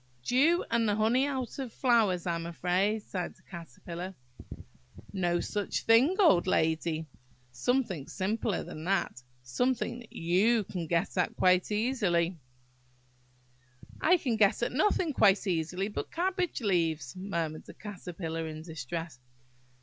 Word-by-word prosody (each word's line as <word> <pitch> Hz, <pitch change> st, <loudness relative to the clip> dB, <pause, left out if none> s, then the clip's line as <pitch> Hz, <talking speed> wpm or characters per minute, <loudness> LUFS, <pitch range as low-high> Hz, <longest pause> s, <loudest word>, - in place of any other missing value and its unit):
"Dew, 300 Hz, -, +3 dB
and 230 Hz, -2 st, +2 dB
the 205 Hz, -, +2 dB
honey 235 Hz, +6 st, +2 dB
out 265 Hz, -2 st, -4 dB
of 260 Hz, -4 st, -4 dB
flowers, 220 Hz, -9 st, +2 dB
I 175 Hz, -, 0 dB
am 170 Hz, 0 st, -3 dB
afraid," 185 Hz, +5 st, 0 dB
sighed 180 Hz, -4 st, -4 dB
the -, -, -26 dB
Caterpillar. 170 Hz, +2 st, -8 dB, 1.0 s
"No 175 Hz, -3 st, +1 dB
such 205 Hz, +2 st, -2 dB
thing, 245 Hz, +10 st, +5 dB
old 195 Hz, -, +5 dB
lady! 160 Hz, -1 st, +1 dB, 0.5 s
Something 185 Hz, -, -1 dB
simpler 205 Hz, 0 st, -1 dB
than 155 Hz, -, -8 dB
that. 190 Hz, -9 st, 0 dB, 0.2 s
Something 240 Hz, -, -1 dB
that 235 Hz, -, -14 dB
you 205 Hz, +7 st, +2 dB
can 180 Hz, -4 st, -5 dB
get 170 Hz, +4 st, 0 dB
at -, -, 0 dB
quite 185 Hz, +2 st, +3 dB
easily." 200 Hz, -7 st, +1 dB, 1.6 s
"I 360 Hz, +3 st, +5 dB
can 245 Hz, -9 st, -1 dB
get 210 Hz, +2 st, +3 dB
at -, -, 0 dB
nothing 315 Hz, +2 st, +1 dB
quite 205 Hz, -4 st, +4 dB
easily 180 Hz, +1 st, -1 dB
but 210 Hz, -, -5 dB
cabbage 360 Hz, -3 st, -1 dB
leaves," 165 Hz, -, 0 dB
murmured 170 Hz, -5 st, -3 dB
the -, -, -11 dB
Caterpillar, 175 Hz, -5 st, -5 dB
in 155 Hz, 0 st, -7 dB
distress. 160 Hz, -1 st, -6 dB
190 Hz, 135 wpm, -30 LUFS, 170-235 Hz, 1.6 s, thing